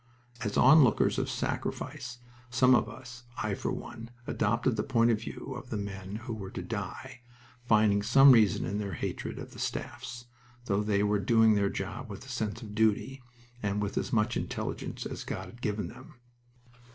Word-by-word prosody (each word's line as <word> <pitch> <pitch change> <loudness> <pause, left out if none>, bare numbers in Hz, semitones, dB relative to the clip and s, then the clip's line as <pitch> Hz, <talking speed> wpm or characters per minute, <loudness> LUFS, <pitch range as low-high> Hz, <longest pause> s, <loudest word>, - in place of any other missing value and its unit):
As 105 -3 -2
onlookers 135 -3 +6
of - - -1
sacrifice 125 0 -3 0.3
some 125 +1 +5
of 115 -2 +3
us 120 +1 -11
I, 110 -2 -1
for - - -2
one 115 +1 -7 0.2
adopted 115 +3 +1
the 105 - 0
point 120 -1 +3
of 110 -1 0
view 120 - -6
of 125 0 -8
the 110 - -2
men 100 -1 -5
who 120 - -3
were 100 -3 -6
to - - -6
die, 120 - -6 0.5
finding 105 -2 +4
some 135 +6 +7
reason 110 -6 +4
in 100 +3 -2
their 100 -2 -3
hatred - - -4
of - - -8
the - - -11
staffs, 120 0 -5 0.4
though 100 -3 +1
they 105 -1 +1
were 105 0 +2
doing 110 +2 +5
their 100 -1 +2
job 110 +7 -5
with 100 +6 -8
a - - -12
sense 115 -2 -3
of 105 -2 -8
duty, 110 +5 +1 0.4
and 105 0 -1
with 105 -1 -2
as - - -2
much 115 0 +2
intelligence - - -4
as - - -5
God - - -4
had 120 - -13
given 105 -2 -1
them. - - -13
110 Hz, 185 wpm, -30 LUFS, 105-120 Hz, 0.5 s, some